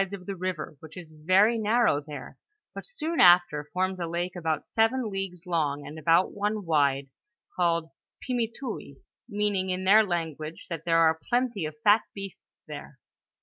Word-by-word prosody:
of 185 -2 -7
the 195 - -4
river, 180 -4 -4
which 160 +3 -13
is 170 -3 -10
very 190 +9 +3
nar 225 +3 +2
row 145 - +3
there, 145 -3 -8 0.4
but - - -8
soon 335 -9 -3
after 175 -5 +5
forms 185 0 -1
a 170 - -2
lake 175 +2 -3
about 160 -3 -2
seven 225 0 +1
leagues 195 -2 -5
long, 150 -5 -1
and 150 +2 -8
about 165 +4 +3
one 205 0 -2
wide, 140 -4 +2 0.5
called 170 -2 +1 0.4
Pimiteoui, 235 - -3 0.3
meaning 205 -2 0
in 185 0 -2
their 210 +4 +6
language 165 -4 -4
that 165 -1 -5
there 165 0 +4
are 160 -1 +4
plenty 240 -7 0
of 155 0 -6
fat 210 +2 +6
beasts 195 -2 -10
there. 145 -2 -9
180 Hz, 165 wpm, -27 LUFS, 160-205 Hz, 0.5 s, their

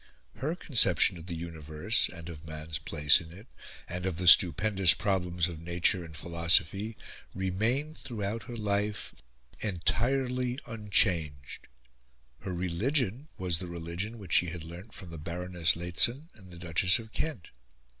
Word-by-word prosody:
Her 150 +6 -2
conception 100 - +3
of 80 - -12
the 85 - -4
universe, 80 +4 -1
and 85 -1 -11
of 80 -3 -9
man's 80 -1 -5
place 75 0 +3
in 80 -1 -12
it, 100 +5 -13 0.4
and 90 +1 -4
of 90 -4 -3
the 90 0 -2
stupendous 95 +1 +7
problems 90 -3 0
of 85 -3 -8
nature 85 +2 0
and 80 -1 -10
philosophy 85 +6 +1 0.4
remained, 110 - -1
throughout 110 -2 -4
her 120 - -6
life, 105 -1 -2 0.5
entirely 125 +6 -1
unchanged. 90 - -1 0.7
Her 95 - -6
religion 115 - -1
was 90 -3 0
the 90 - -6
religion 85 +6 -5
which 95 -7 -6
she 90 - +4
had 85 -1 -6
learnt 85 +7 -11
from 90 -3 -10
the 80 - -8
Baroness 85 +1 0
Lehzen 115 - +2
and 95 -5 -16
the 85 - -12
Duchess 85 +2 +3
of 110 -1 -10
Kent. 150 - -4
90 Hz, 145 wpm, -29 LUFS, 85-110 Hz, 0.7 s, stupendous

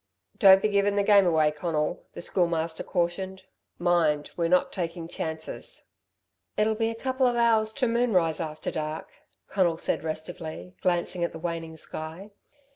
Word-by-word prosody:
"Don't 195 0 +8
be - - +4
giving 200 0 +2
the 200 - +2
game 200 -2 +6
away, 155 -3 +3
Conal," 150 +1 -2
the - - -6
Schoolmaster 170 -3 0
cautioned. 190 +2 -2 0.3
"Mind, 165 -4 +2
we're 170 -1 +1
not 180 +1 +3
taking 170 -2 -4
chances." 160 -1 -6 0.7
"It'll 215 +1 +3
be 225 +1 0
a 230 - -4
couple 260 +2 +1
of 245 - +1
hours 225 -2 +3
to 260 0 0
moonrise 215 -9 +2
after 155 -2 -4
dark," 155 0 -4 0.4
Conal 175 -4 +1
said - - -1
restively, 160 +2 -6
glancing 175 0 0
at 170 - -1
the - - -6
waning 165 -1 -4
sky. 160 +7 -7
175 Hz, 155 wpm, -27 LUFS, 160-200 Hz, 0.7 s, Don't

